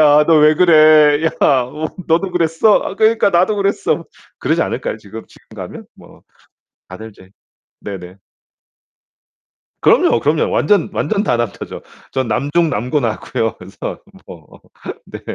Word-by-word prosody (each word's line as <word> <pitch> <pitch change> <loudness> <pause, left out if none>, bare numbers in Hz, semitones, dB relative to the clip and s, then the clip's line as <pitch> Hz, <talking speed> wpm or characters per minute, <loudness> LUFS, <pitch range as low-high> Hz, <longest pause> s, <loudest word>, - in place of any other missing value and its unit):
"야, 150 0 +5
너 165 - +4
왜 150 +1 +5
그래? 155 -2 +5
야, 160 - +2 0.8
너도 170 +3 +1
그랬어? 175 +4 +1
그러니까 220 -1 +2
나도 185 +4 +2
그랬어." 200 0 -1 0.3
그러지 - - 0
않을까요? - - -4
지금, 110 +1 -11
지금 - - -22
가면? - - -9
뭐 - - -18 0.7
다들 110 +5 -10
이제 95 -2 -19 0.5
네네. 95 -2 -9 1.6
그럼요, 115 - +3
그럼요. 155 +2 0
완전, 185 +3 +1
완전 210 -2 -1
다 125 - 0
남자죠. 120 -4 -5 0.3
전 130 -3 -2
남중 150 +7 0
남고 125 +8 -1
나왔고요. 115 -2 -3
그래서 90 +2 -8 0.3
뭐 - - -14 0.5
네. - - -10
150 Hz, 265 characters per minute, -16 LUFS, 115-175 Hz, 1.6 s, 야